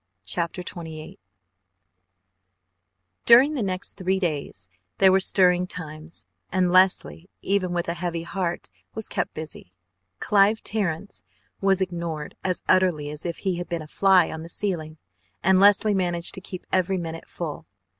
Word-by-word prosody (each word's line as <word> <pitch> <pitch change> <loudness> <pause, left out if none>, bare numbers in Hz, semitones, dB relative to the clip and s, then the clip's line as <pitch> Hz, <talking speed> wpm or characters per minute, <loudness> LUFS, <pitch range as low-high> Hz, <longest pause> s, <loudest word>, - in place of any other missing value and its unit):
CHAPTER 170 - -2
XXVIII 160 -3 -8 2.1
During 255 +6 +7
the 275 - -2
next 185 -2 -3
three 190 0 0
days 145 - -3 0.3
there 190 -1 +6
were 190 - +5
stirring 180 -1 +3
times, 160 -2 -8 0.3
and 180 -1 +2
Leslie, 185 -1 +3
even 195 -2 0
with 175 -1 -2
a 170 - 0
heavy 170 -1 -3
heart, 175 -1 -3 0.2
was 220 -1 -3
kept - - -3
busy. 155 - -8 0.5
Clive 205 +2 +3
Terrence 200 -3 -2 0.4
was 195 -1 +2
ignored 170 -4 -4
as 185 -1 -2
utterly 165 -6 +2
as 150 +3 -6
if 170 - -4
he 190 -3 -2
had 175 - -5
been 170 -2 -3
a - - -12
fly 190 +1 +4
on 160 - -6
the 165 - -9
ceiling, 165 -5 -3 0.5
and 190 +1 +5
Leslie 205 +1 +5
managed 175 -3 0
to 190 - -6
keep 185 -1 -8
every 185 +1 +1
minute 165 -2 -6
full. - - -6
180 Hz, 150 wpm, -24 LUFS, 165-190 Hz, 2.1 s, During